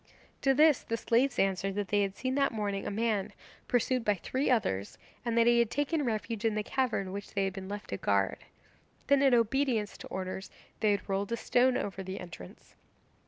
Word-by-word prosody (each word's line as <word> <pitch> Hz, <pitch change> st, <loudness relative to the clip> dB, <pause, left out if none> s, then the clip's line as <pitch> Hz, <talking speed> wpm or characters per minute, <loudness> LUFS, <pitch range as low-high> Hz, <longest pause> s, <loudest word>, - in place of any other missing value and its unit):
To 270 Hz, -1 st, +3 dB
this 305 Hz, -1 st, +5 dB
the 230 Hz, -, -3 dB
slaves 245 Hz, +3 st, +2 dB
answered 195 Hz, 0 st, +1 dB
that 205 Hz, -2 st, -2 dB
they 205 Hz, 0 st, +3 dB
had 195 Hz, -1 st, -1 dB
seen 255 Hz, +4 st, -2 dB
that 275 Hz, 0 st, +2 dB
morning 205 Hz, -3 st, -2 dB
a -, -, 0 dB
man 210 Hz, -1 st, -1 dB, 0.3 s
pursued 250 Hz, 0 st, +1 dB
by 210 Hz, -2 st, +2 dB
three 260 Hz, -, -2 dB
others, 105 Hz, -, 0 dB, 0.3 s
and 235 Hz, -1 st, -1 dB
that 230 Hz, -, +5 dB
he 240 Hz, 0 st, +5 dB
had 235 Hz, -2 st, +3 dB
taken 290 Hz, +3 st, 0 dB
refuge 225 Hz, -2 st, -2 dB
in 225 Hz, -2 st, +1 dB
the 215 Hz, -, 0 dB
cavern 230 Hz, -7 st, -1 dB
which 200 Hz, +1 st, -7 dB
they 200 Hz, -, +2 dB
had 195 Hz, -1 st, -1 dB
been 190 Hz, 0 st, -7 dB
left 205 Hz, 0 st, -6 dB
to 100 Hz, -, -2 dB
guard. 100 Hz, -1 st, +1 dB, 0.7 s
Then, 280 Hz, 0 st, +4 dB
in 270 Hz, -3 st, +5 dB
obedience 235 Hz, -2 st, +1 dB
to -, -, -8 dB
orders, 190 Hz, 0 st, -5 dB, 0.3 s
they 215 Hz, -, +2 dB
had 200 Hz, -1 st, 0 dB
rolled 195 Hz, +2 st, -1 dB
a -, -, 0 dB
stone 250 Hz, +2 st, +3 dB
over 195 Hz, -1 st, -4 dB
the 190 Hz, +1 st, -6 dB
entrance. 170 Hz, -, -11 dB
215 Hz, 210 wpm, -30 LUFS, 195-250 Hz, 0.7 s, this